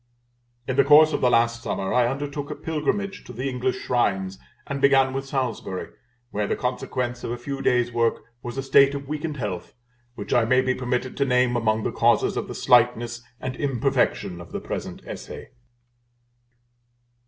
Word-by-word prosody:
In 130 Hz, -, -2 dB
the 140 Hz, -, +6 dB
course 150 Hz, +2 st, +7 dB
of -, -, -1 dB
last 115 Hz, -1 st, +3 dB
summer 95 Hz, -4 st, -2 dB
I 125 Hz, -1 st, +4 dB
undertook 145 Hz, +2 st, -4 dB
a -, -, -4 dB
pilgrimage 195 Hz, +6 st, -2 dB
to 125 Hz, -, -9 dB
the 125 Hz, +4 st, -3 dB
English 125 Hz, -1 st, -1 dB
Shrines, 95 Hz, -6 st, -1 dB, 0.3 s
and 140 Hz, -1 st, -4 dB
began 135 Hz, -1 st, +4 dB
with 135 Hz, 0 st, -4 dB
Salisbury, 125 Hz, -9 st, -3 dB, 0.4 s
where 105 Hz, 0 st, -1 dB
the -, -, 0 dB
consequence 125 Hz, -1 st, -3 dB
of -, -, -3 dB
a 120 Hz, -, -3 dB
few 135 Hz, +3 st, -5 dB
days' 125 Hz, -2 st, +2 dB
work 115 Hz, -1 st, 0 dB, 0.2 s
was 120 Hz, +1 st, -6 dB
a 135 Hz, -, -2 dB
state 140 Hz, +1 st, +5 dB
of 140 Hz, -1 st, -6 dB
weakened 150 Hz, +1 st, -4 dB
health, 100 Hz, -8 st, -5 dB, 0.4 s
which -, -, -4 dB
I 120 Hz, -, +4 dB
may 130 Hz, +3 st, +3 dB
be 130 Hz, 0 st, +1 dB
permitted 125 Hz, 0 st, -2 dB
to 140 Hz, -, +2 dB
name 125 Hz, -1 st, +2 dB
among 110 Hz, -2 st, +1 dB
the -, -, -1 dB
causes -, -, +2 dB
of -, -, -3 dB
the -, -, -7 dB
slightness 120 Hz, -1 st, +3 dB, 0.2 s
and 130 Hz, -1 st, -4 dB
imperfection 135 Hz, -10 st, 0 dB
of 85 Hz, -, -12 dB
the -, -, -3 dB
present -, -, -6 dB
Essay. -, -, -8 dB
125 Hz, 175 wpm, -24 LUFS, 120-140 Hz, 0.4 s, course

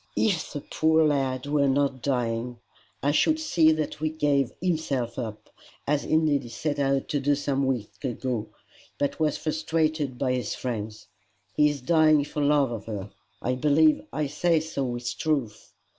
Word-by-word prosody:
"If 195 Hz, -8 st, +1 dB
the 145 Hz, -, -4 dB
poor 160 Hz, +2 st, +2 dB
lad 135 Hz, -3 st, 0 dB
were 145 Hz, -1 st, +2 dB
not 135 Hz, -1 st, +1 dB
dying, 120 Hz, -2 st, -1 dB, 0.5 s
I 145 Hz, -, +3 dB
should 310 Hz, -, +3 dB
see 165 Hz, -, +4 dB
that 155 Hz, -1 st, -2 dB
he 155 Hz, +1 st, -2 dB
gave 145 Hz, -4 st, +1 dB
himself 140 Hz, -9 st, -1 dB
up, 110 Hz, -3 st, -6 dB, 0.3 s
as 145 Hz, 0 st, +1 dB
indeed 155 Hz, -3 st, +2 dB
he 120 Hz, -, -10 dB
set 145 Hz, +5 st, -3 dB
out 135 Hz, -1 st, +1 dB
to 145 Hz, -, 0 dB
do 145 Hz, +1 st, +2 dB
some 140 Hz, -1 st, -1 dB
weeks 125 Hz, -3 st, -3 dB
ago, 120 Hz, -3 st, -2 dB, 0.5 s
but 145 Hz, +2 st, -1 dB
was 155 Hz, -2 st, +1 dB
frustrated 155 Hz, -3 st, -1 dB
by 130 Hz, -1 st, 0 dB
his 125 Hz, -5 st, -2 dB
friends. 110 Hz, -3 st, -5 dB, 0.5 s
He 150 Hz, 0 st, +5 dB
is 145 Hz, -2 st, -4 dB
dying 155 Hz, +1 st, +4 dB
for 150 Hz, -, -4 dB
love 145 Hz, -3 st, +3 dB
of 115 Hz, -2 st, -5 dB
her. 100 Hz, -3 st, -5 dB, 0.3 s
I 125 Hz, -, +1 dB
believe 150 Hz, +4 st, +3 dB
I 155 Hz, -, -1 dB
say 160 Hz, +3 st, +1 dB
so 155 Hz, -3 st, -3 dB
with 120 Hz, 0 st, -4 dB
truth. 135 Hz, -10 st, -2 dB
140 Hz, 170 wpm, -26 LUFS, 125-155 Hz, 0.5 s, He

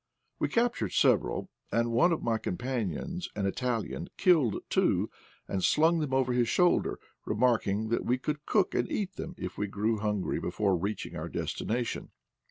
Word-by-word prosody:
We -, -, +1 dB
captured 230 Hz, -, +1 dB
several, -, -, +2 dB, 0.2 s
and 115 Hz, 0 st, +1 dB
one 145 Hz, +10 st, +4 dB
of 165 Hz, -, -1 dB
my 115 Hz, -1 st, +1 dB
com 90 Hz, -, -3 dB
panions, 130 Hz, -, -3 dB
an 100 Hz, -2 st, -1 dB
Italian, 115 Hz, +3 st, -2 dB
killed 160 Hz, -, +4 dB
two -, -, +2 dB, 0.4 s
and 95 Hz, -2 st, -2 dB
slung 165 Hz, +2 st, +4 dB
them 150 Hz, -4 st, -2 dB
over 130 Hz, -1 st, +2 dB
his 120 Hz, -2 st, +2 dB
shoulder, 180 Hz, -1 st, +3 dB, 0.3 s
remarking 110 Hz, -2 st, +1 dB
that 115 Hz, -, 0 dB
we 125 Hz, -, +1 dB
could 150 Hz, +3 st, -4 dB
cook 200 Hz, -4 st, +2 dB
and -, -, 0 dB
eat 195 Hz, -2 st, -2 dB
them 175 Hz, -, -6 dB
if -, -, -6 dB
we 105 Hz, -, 0 dB
grew 105 Hz, +2 st, 0 dB
hungry 105 Hz, -2 st, -1 dB
before 95 Hz, +2 st, 0 dB
reaching 100 Hz, +5 st, -3 dB
our -, -, -4 dB
destination. 120 Hz, +1 st, -2 dB
120 Hz, 170 wpm, -30 LUFS, 105-155 Hz, 0.4 s, one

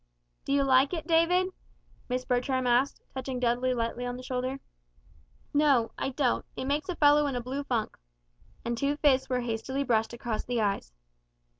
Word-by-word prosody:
"Do -, -, -3 dB
you 280 Hz, 0 st, +3 dB
like 270 Hz, +4 st, +4 dB
it, 320 Hz, -2 st, -5 dB
David?" 355 Hz, +3 st, +3 dB, 0.6 s
Miss 250 Hz, 0 st, -1 dB
Bertram 255 Hz, +1 st, 0 dB
asked, 245 Hz, +3 st, +2 dB
touching 260 Hz, -1 st, -4 dB
Dudley 245 Hz, +1 st, +1 dB
lightly 235 Hz, 0 st, -2 dB
on 245 Hz, 0 st, -3 dB
the 255 Hz, -, -9 dB
shoulder. 255 Hz, +1 st, -3 dB, 0.9 s
"No 280 Hz, -6 st, +3 dB
I -, -, -2 dB
don't 265 Hz, -2 st, 0 dB
it -, -, -4 dB
makes 290 Hz, +5 st, -1 dB
a 360 Hz, -, -1 dB
fellow 295 Hz, -1 st, +5 dB
in 275 Hz, -, -2 dB
a -, -, 0 dB
blue 260 Hz, +4 st, -4 dB
funk." 235 Hz, -6 st, -2 dB, 0.7 s
And 235 Hz, 0 st, -1 dB
two 280 Hz, +4 st, 0 dB
fists 270 Hz, -4 st, +3 dB
were 250 Hz, -1 st, 0 dB
hastily 245 Hz, +4 st, -2 dB
brushed 225 Hz, -4 st, +1 dB
across 235 Hz, -2 st, -3 dB
the 245 Hz, -1 st, -2 dB
eyes. 200 Hz, -, -1 dB
255 Hz, 175 wpm, -29 LUFS, 245-280 Hz, 0.9 s, fellow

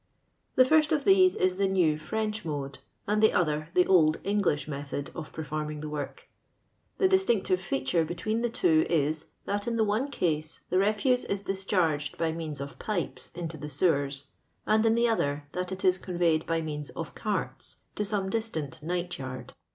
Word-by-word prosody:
The 255 Hz, -, +7 dB
first 310 Hz, +2 st, +4 dB
of 295 Hz, -3 st, +1 dB
these 375 Hz, -1 st, +6 dB
is 185 Hz, 0 st, +1 dB
the 200 Hz, 0 st, +2 dB
now 180 Hz, -5 st, +3 dB
French 215 Hz, +7 st, -3 dB
mode, 140 Hz, -4 st, -4 dB, 0.3 s
a>id 210 Hz, +1 st, +2 dB
the 220 Hz, -, +6 dB
other 155 Hz, -3 st, 0 dB
the 180 Hz, -, +5 dB
old 160 Hz, -4 st, +4 dB
English 200 Hz, -8 st, +1 dB
method 140 Hz, -1 st, -5 dB
of 160 Hz, -3 st, -7 dB
per. 160 Hz, -, -5 dB
forming 150 Hz, 0 st, -4 dB
tho 155 Hz, -, -5 dB
work. 150 Hz, -2 st, -6 dB, 0.7 s
The 385 Hz, -, +4 dB
^Unctive 235 Hz, -, +2 dB
feature 165 Hz, -1 st, 0 dB
be 165 Hz, +2 st, -4 dB
tween 215 Hz, +6 st, -1 dB
me 240 Hz, -, +1 dB
two 320 Hz, +5 st, +3 dB
is, 155 Hz, -1 st, +1 dB, 0.2 s
that 205 Hz, +1 st, -2 dB
in 235 Hz, -, 0 dB
the 225 Hz, -, +3 dB
one 215 Hz, +7 st, 0 dB
ease 155 Hz, -3 st, -1 dB
the 185 Hz, -, +3 dB
refuse 215 Hz, +5 st, +2 dB
ia 200 Hz, -, +1 dB
discharged 185 Hz, -7 st, 0 dB
by 165 Hz, -1 st, 0 dB
means 160 Hz, -3 st, -5 dB
of 140 Hz, 0 st, -7 dB
pipes 200 Hz, -6 st, -3 dB
iAto 165 Hz, -3 st, -5 dB
the 150 Hz, -, -5 dB
sewers, 140 Hz, -2 st, +1 dB, 0.4 s
and 215 Hz, +1 st, +3 dB
in 225 Hz, -, +4 dB
the 235 Hz, 0 st, +3 dB
other 145 Hz, -10 st, 0 dB
that 180 Hz, 0 st, -3 dB
it 190 Hz, 0 st, -4 dB
is 185 Hz, 0 st, +4 dB
conveyed 170 Hz, -4 st, 0 dB
by 165 Hz, 0 st, +1 dB
means 150 Hz, -2 st, -4 dB
of -, -, -6 dB
carts -, -, -3 dB
to 210 Hz, -, -2 dB
some 205 Hz, -2 st, -1 dB
distant 190 Hz, -9 st, -2 dB
night 175 Hz, +2 st, -3 dB
yard. 130 Hz, -1 st, -7 dB
175 Hz, 190 wpm, -28 LUFS, 150-210 Hz, 0.7 s, The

